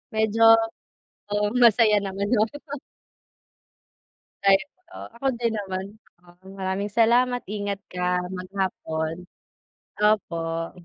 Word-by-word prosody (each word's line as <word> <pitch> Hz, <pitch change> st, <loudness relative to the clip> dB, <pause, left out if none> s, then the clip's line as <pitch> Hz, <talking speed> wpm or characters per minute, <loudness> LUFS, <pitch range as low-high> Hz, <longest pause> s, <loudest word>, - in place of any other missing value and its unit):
Medyo 220 Hz, +1 st, 0 dB, 0.9 s
oo 205 Hz, 0 st, +1 dB, 0.2 s
masaya 225 Hz, -2 st, +6 dB
naman 200 Hz, 0 st, -3 dB
yung 220 Hz, -2 st, +3 dB
ano. 290 Hz, 0 st, -8 dB, 1.7 s
Ay, 195 Hz, 0 st, +6 dB, 0.3 s
o -, -, -13 dB, 0.2 s
ako 270 Hz, +3 st, -3 dB
din 230 Hz, -2 st, 0 dB
naman 190 Hz, -2 st, -4 dB, 0.3 s
'no. 180 Hz, +2 st, -16 dB
Maraming 190 Hz, +2 st, -3 dB
salamat 245 Hz, +3 st, +3 dB
ingat 200 Hz, -1 st, -3 dB
ka 180 Hz, 0 st, 0 dB
maghapon, 180 Hz, -4 st, -3 dB, 0.8 s
opo. 165 Hz, -6 st, 0 dB
200 Hz, 100 wpm, -24 LUFS, 185-220 Hz, 1.7 s, masaya